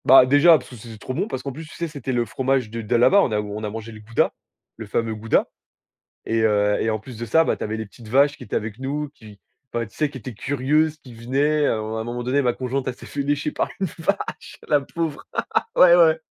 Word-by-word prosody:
Bah, 130 -1 +8
déjà 145 +5 +6
parce 125 - -11
que 125 - -10
c 115 0 -11
c'est 110 - -10
trop 130 - -6
bon, 195 - -1
parce 130 -12 -5
qu'en 140 - -4
plus 155 +4 -9
tu - - -13
sais 170 - -3
c'était 145 -4 -5
le 120 -2 +1
fromage 130 -2 0
de 115 0 -4
d'à 120 +2 +1
là-bas, 195 +12 +6
on 125 - +1
a 105 - +1
on 105 +1 -5
a 105 - -2
mangé 110 +1 -7
le 110 - -11
gouda, 110 +2 0 0.4
le 110 -1 -8
fameux 115 +2 -1
gouda. 110 +1 +1 0.8
Et, 115 0 +1
heu 105 0 +2
en 110 - -1
plus 115 +3 -11
de 120 - -5
ça, 160 +9 +4
bah - - 0
tu - - -5
avais 110 +1 -3
les 110 0 -5
petites 115 +3 -15
vaches 140 +5 +4
qui - - -13
étaient - - -6
avec 110 +1 -4
nous, 145 +3 -3
qui 105 -6 -15 0.3
enfin 120 0 -1
tu 105 - -19
sais 150 -2 0
qui 135 - -8
étaient 125 +1 -8
curieuses, 145 +6 +1
qui 130 -4 -14
venaient, 140 +6 +1
à - - +2
un 110 +1 -4
à - - -2
un - - -3
moment 120 +1 -4
donné 130 +4 +1
ma 125 -2 +2
conjointe 130 +1 -3
elle 125 - -2
s'est - - -13
fait 140 - -3
lécher 145 +1 0
par - - -1
une 190 - +1
vache, 200 +5 -3
la 145 -1 +4
pauvre! 155 +1 -4 0.5
Ouais 175 -1 +8
ouais! 160 -2 +5
125 Hz, 270 wpm, -23 LUFS, 110-145 Hz, 0.8 s, Bah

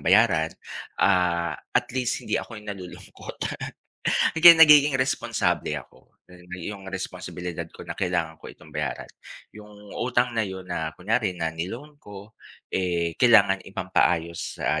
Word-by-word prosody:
bayaran, 95 -6 +4 0.5
ah, 85 -3 +2
at 75 - -2
least 125 -1 -1
hindi - - 0
ako 115 - -10
yung 105 - -13
nalulungkot. 90 -3 -11 1.0
Hanggang 170 +1 +10
nagiging 150 -3 +8
responsable 130 0 -1
ako - - -12 0.2
dahil 90 0 -17
may 90 +1 -6
iyong 95 -1 -10
responsibilidad 90 -3 -6
ko - - -12
na, - - -5
kailangan 85 -4 -2
ko - - -10
itong 75 - -15
bayaran, 75 -1 -4 0.4
yung 105 0 -13 0.3
utang 125 0 +1
na 115 - 0
'yon, 95 -1 -7
na 85 -3 -3
kunyari 105 0 0
na 80 -2 -2
ni-loan 115 - -7
ko, 100 -1 -12 0.4
eh, 85 -3 0
kailangan 100 -6 +5
ipampaayos 90 -3 -1
sa, 75 +3 0
95 Hz, 140 wpm, -25 LUFS, 85-115 Hz, 1.0 s, Hanggang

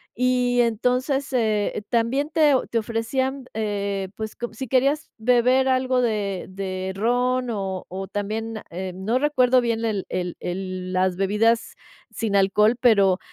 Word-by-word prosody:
y 250 0 +2
entonces, 250 +5 0
eh, 215 -4 0
también 250 +6 +1
te 305 -3 +4 0.2
te 235 - -1
ofrecían, 255 +4 -2
eh, 200 -3 -2
pues, 220 -1 -6
com 240 - -5
si 260 +3 -6
querías 275 +5 +1
beber 250 +3 +3
algo 255 -1 +2
de 205 -5 -1
de 185 0 -4
ron 245 +4 +1
o 195 -4 -3
o 190 +1 -5
también, 215 +2 -4
em, 185 +1 -6
no 235 +4 +2
recuerdo 260 -3 +3
bien 230 -1 -1
el 205 -4 -1
el 180 -1 -3
el 185 0 -4
las 185 0 +1
bebidas 210 +5 +1 0.4
sin 215 -3 -2
alcohol, 210 +4 +4
pero 200 -6 +4
225 Hz, 145 wpm, -23 LUFS, 195-250 Hz, 0.4 s, te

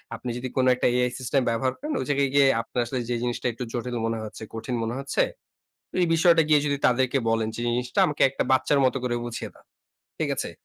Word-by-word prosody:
আপনি 125 - -6
যদি 125 +1 -4
কোন 130 - +2
একটা 125 - +1
AI 125 0 +2
সিস্টেম 130 +1 +1
ব্যবহার 125 +3 0
করেন, 300 +3 -5
ওই - - -3
জায়গায় 140 -1 +2
গিয়ে 140 -1 +5
আপনার 115 - -5
আসলে 125 +2 -3
যে 120 - 0
জিনিসটা 120 +1 -2
একটু 115 - -6
জটিল 120 0 -3
মনে 115 0 -1
হচ্ছে, 110 0 -8
কঠিন 115 +3 -4
মনে 115 +2 -3
হচ্ছে, 140 0 +1 0.8
এই - - +4
বিষয়টা 165 0 +5
গিয়ে 150 -1 +6
যদি 145 -1 0
তাদেরকে 130 +1 +2
বলেন 115 -1 +1
যে, - - -6
"জিনিসটা 125 +1 -1
আমাকে 150 - -3
একটা 135 - -2
বাচ্চার 135 +2 +3
মতো 130 - +1
করে 120 -1 0
বুঝিয়ে 120 -1 -5
দাও।" - - -22 0.5
ঠিক - - 0
আছে? - - -3
125 Hz, 220 wpm, -25 LUFS, 120-140 Hz, 0.8 s, গিয়ে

